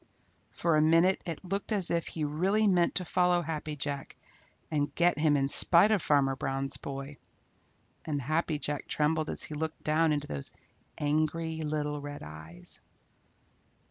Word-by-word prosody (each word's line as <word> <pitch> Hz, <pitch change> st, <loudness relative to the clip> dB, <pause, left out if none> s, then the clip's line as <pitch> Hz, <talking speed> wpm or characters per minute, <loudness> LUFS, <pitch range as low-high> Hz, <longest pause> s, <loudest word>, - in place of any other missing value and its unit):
For 165 Hz, -2 st, 0 dB
a -, -, +4 dB
minute 165 Hz, +4 st, +4 dB
it 165 Hz, +2 st, -5 dB
looked 195 Hz, +4 st, -3 dB
as 195 Hz, -5 st, +2 dB
if 170 Hz, -1 st, 0 dB
he 160 Hz, -, -4 dB
really 185 Hz, +9 st, +1 dB
meant 180 Hz, -4 st, +3 dB
to 180 Hz, -, +3 dB
follow 180 Hz, 0 st, +2 dB
Happy 155 Hz, -1 st, -4 dB
Jack 140 Hz, -1 st, -4 dB, 0.6 s
and 145 Hz, -2 st, -1 dB
get 170 Hz, -2 st, +2 dB
him 150 Hz, -2 st, +3 dB
in 135 Hz, -1 st, +1 dB
spite 175 Hz, +8 st, +6 dB
of 210 Hz, -4 st, +2 dB
Farmer 140 Hz, -3 st, +2 dB
Brown's 135 Hz, +1 st, -2 dB
boy, 140 Hz, +1 st, -7 dB, 0.9 s
and 150 Hz, -2 st, -2 dB
Happy 155 Hz, +3 st, -1 dB
Jack 145 Hz, -1 st, -3 dB
trembled 155 Hz, +1 st, 0 dB
as -, -, 0 dB
he -, -, -5 dB
looked 160 Hz, +1 st, -4 dB
down 155 Hz, +1 st, +2 dB
into 145 Hz, -1 st, -1 dB
those 70 Hz, -, -4 dB, 0.4 s
angry 155 Hz, +2 st, -1 dB
little 150 Hz, -1 st, -2 dB
red 145 Hz, 0 st, -7 dB
eyes. 80 Hz, +3 st, -9 dB
155 Hz, 160 wpm, -30 LUFS, 145-170 Hz, 0.9 s, spite